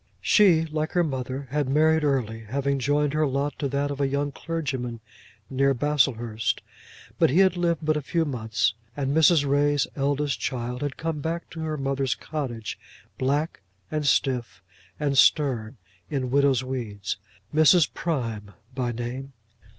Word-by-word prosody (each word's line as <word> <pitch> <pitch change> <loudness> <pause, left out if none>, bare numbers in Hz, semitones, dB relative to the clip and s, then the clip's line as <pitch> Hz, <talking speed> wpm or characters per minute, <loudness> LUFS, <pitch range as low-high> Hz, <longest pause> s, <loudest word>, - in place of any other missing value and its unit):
She, 175 -7 +5
like 155 0 -3
her 175 - +3
mother, 130 -2 -4
had 145 -2 0
married 155 +2 +3
early, 125 -6 0
having 140 +4 -1
joined 145 +2 +1
her 155 0 +2
lot 140 +2 -1
to 140 - 0
that 140 +1 -1
of 140 0 -4
a 140 - +3
young 140 +1 -1
clergyman 135 -7 -4 0.5
near 135 +1 +2
Baslehurst; 120 -6 0 0.6
but - - +5
he 140 - +1
had 190 -1 +5
lived 170 -3 0
but 155 0 +2
a 150 - -1
few 165 +3 0
months, 110 -5 0 0.2
and 140 0 -1
Mrs. 160 -2 +5
Ray's 145 +1 +2
eldest 140 -3 0
child 125 +1 -3
had 145 -2 -3
come 165 -2 -3
back 165 +3 -4
to 165 - -8
her 155 -1 -2
mother's 135 -1 0
cottage, 125 -8 -5 0.4
black, 145 0 0 0.3
and 155 -1 -1
stiff, 120 -9 0 0.4
and 145 -2 0
stern, 130 -5 +3 0.3
in 130 -4 -2
widow's 140 -2 +3
weeds, 115 -7 -4 0.4
Mrs. 155 +1 +6
Prime 115 -11 -3 0.2
by 125 -2 -1
name. 125 +4 -5
140 Hz, 155 wpm, -25 LUFS, 125-150 Hz, 0.6 s, Mrs